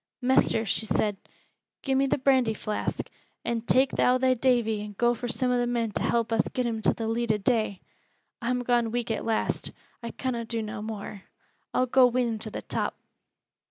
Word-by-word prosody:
"Mester," 245 -3 +3
she 220 +2 0
said, 210 -2 +1 0.7
"gi' 270 - 0
me 270 +1 +3
th' 265 0 -1
brandy 255 -5 +3
flask, 210 0 -3 0.4
and 235 -1 -2
tak' 260 +1 +4
thou 250 +1 +3
thy 255 0 +3
Davy 235 -4 +1
an' 210 -1 -8
go 240 0 +3
fur 245 +1 -5
some 245 +2 0
o' 245 - +2
the 240 - +1
men 235 -2 -1
to - - -3
help 230 -1 +1
us 225 - +2
get 250 - -2
him 225 -2 -2
to - - +4
th' - - -8
leet 225 +1 0
o' 215 - +2
day. 215 -2 0 0.6
I'm 250 +1 -1
gone 240 -2 +2
weak 235 0 -2
at 220 - -2
last. 225 -1 -1 0.3
I 235 - -5
conna 240 -1 -3
do 230 -1 -2
no 210 0 -5
more. 210 -2 -7 0.5
I'll 255 - +2
go 255 0 +5
wi' 250 +1 +1
him 230 -3 -1
to 215 - -5
th' - - -7
top." - - -2
235 Hz, 205 wpm, -27 LUFS, 220-250 Hz, 0.7 s, go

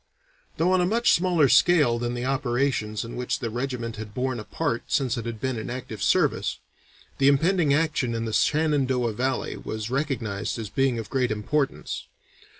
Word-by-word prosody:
Though 175 +3 +2
on 185 -1 +4
a - - +3
much 230 +4 +3
smaller 175 -4 +3
scale 145 -6 +4
than 120 0 -2
the 120 +1 -3
operations 125 -5 0
in 115 - -7
which 125 +3 -2
the 120 -6 -4
regiment 120 -2 -3
had 110 -1 -8
borne 130 -1 -1
a - - -6
part 115 +2 -2
since 135 -3 +1
it 115 -1 -4
had 115 -2 -5
been 130 -2 -2
in - - -6
active 120 -3 -6
service, - - +2 0.6
the 135 - +4
impending 160 +3 +3
action 140 -5 +1
in 115 0 -2
the 110 - -4
Shenandoah 135 -7 +2
Valley 130 +3 -2
was 110 +1 -5
recognized 130 -9 -2
as 110 -3 -6
being 135 0 +1
of 110 -3 -6
great 130 -2 +1
importance. 135 +7 -2
125 Hz, 180 wpm, -25 LUFS, 115-140 Hz, 0.6 s, on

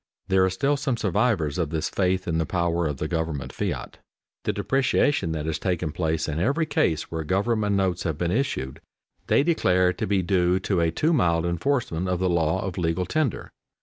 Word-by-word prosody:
There 95 0 +4
are 95 - +3
still 140 +10 0
some 135 -3 -1
survivors 100 - 0
of 80 -4 0
this 80 0 -1
faith 95 0 0
in 80 -1 0
the 80 - +1
power 85 -2 0
of 75 -2 -3
the 80 - -2
government 80 -4 -3
fiat. - - -4 0.5
The - - +2
depreciation 135 - +1
that 75 -1 -3
has 80 -1 -2
taken 90 -4 -1
place 80 0 -1
in 75 0 -2
every 140 - +1
case 80 - 0
where 80 -1 -3
government 105 +4 +1
notes 95 -3 0
have 80 -3 -2
been 85 +1 -1
issued, 105 - -2 0.5
they - - +4
declare 90 - +2
to - - -3
be 95 -1 +1
due 90 0 +2
to 95 -1 0
a 85 - +2
too 155 - +1
mild 85 - +2
enforcement 90 - -1
of 90 - +1
the 90 0 0
law 80 0 +1
of 95 -2 -4
legal 85 +1 0
tender. 150 - -1
90 Hz, 200 wpm, -25 LUFS, 80-105 Hz, 0.5 s, There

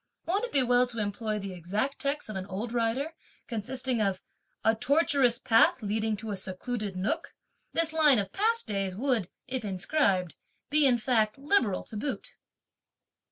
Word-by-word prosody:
Won't 395 +7 0
it - - -9
be 275 -2 +4
well 245 0 +4
to 240 -1 -7
employ 215 +1 -2
the 195 -2 -5
exact 205 - -2
text 285 +1 -1
of 215 - -6
an 190 0 -4
old 210 +5 -4
writer 245 +7 0 0.3
consisting 245 +2 -2
of 195 -3 0 0.4
'a 225 - +4
tortuous 265 0 +2
path 225 +1 +4
leading 215 +1 -1
to 215 +1 -5
a - - -2
secluded 195 +2 -4
(nook).' 185 +3 -2 0.4
This 325 -1 +1
line 300 -5 +6
of 200 -2 -2
past 455 +3 +1
days 195 -3 -2
would, 230 -5 0 0.2
if 255 -2 -3
inscribed, 190 - 0 0.3
be, 300 -1 +5
in 245 -2 +4
fact, 220 -1 +1
liberal 270 - +1
to - - -10
boot." 265 +6 -3
225 Hz, 165 wpm, -29 LUFS, 205-270 Hz, 0.4 s, line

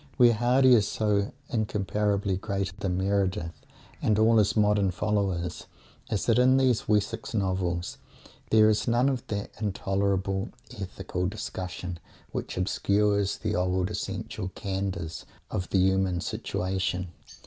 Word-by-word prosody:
Where 120 -3 +7
Mr. - - -4
Hardy 125 +2 +5
is 105 -4 +4
so 105 -2 0 0.2
incomparably 105 -3 0
greater 100 0 -2
than 90 -2 -1
Meredith 95 -5 -1 0.4
and 105 - +2
all 110 +1 +5
his 105 +1 +2
modern 105 -2 +3
followers 95 -3 -1 0.4
is 105 - -1
that 115 0 +3
in 130 +1 +5
these 130 -4 +2
Wessex 110 +2 0
novels 95 -3 -1 0.5
there 110 -1 +6
is 110 +2 +2
none 120 +3 +3
of 130 -3 -1
that 100 -1 -4
intolerable 95 -1 0 0.2
"ethical 95 -4 -4
discussion" 90 -2 -5 0.3
which - - -4
obscures 100 +2 +1
"the 105 -1 -2
old 90 +1 0
essential 100 0 -4
candours" 95 -4 -3 0.3
of 90 - -3
the - - +1
human 95 -1 +2
situation. 90 0 -2
100 Hz, 130 wpm, -27 LUFS, 95-110 Hz, 0.5 s, Where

